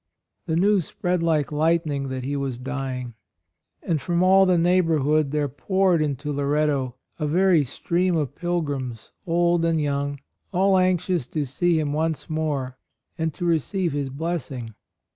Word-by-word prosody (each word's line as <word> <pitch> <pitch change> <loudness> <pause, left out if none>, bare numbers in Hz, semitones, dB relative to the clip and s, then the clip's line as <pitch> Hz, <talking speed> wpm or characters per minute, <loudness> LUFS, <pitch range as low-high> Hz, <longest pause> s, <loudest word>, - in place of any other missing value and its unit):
The 160 - 0
news 195 0 +3
spread 180 -1 -1
like 155 -5 +1
light 160 +3 +2
ning 140 -2 -2
that 130 -1 -4
he 140 +3 -2
was 135 -3 -2
dying; 130 -2 -4 0.7
and 160 -5 0
from 175 +4 +1
all 190 +1 +6
the 180 -1 +4
neighborhood 160 -4 +2
there 150 0 0
poured 185 +5 +1
into 145 0 -2
Loretto 140 -2 0 0.2
a 150 - -1
very 175 0 +4
stream 175 +7 0
of 145 -4 -1
pilgrims, 145 -9 -3 0.2
old 170 0 +2
and 165 -1 +2
young, 140 -1 -1 0.3
all 190 0 +3
anxious 180 -5 +1
to 150 +1 -2
see 165 +5 +1
him 145 -2 -1
once 160 -1 -1
more 145 -5 -2 0.4
and 160 0 0
to 175 - -4
receive 170 +2 0
his 140 -1 -2
blessing. 135 -6 -4
155 Hz, 155 wpm, -24 LUFS, 140-175 Hz, 0.7 s, all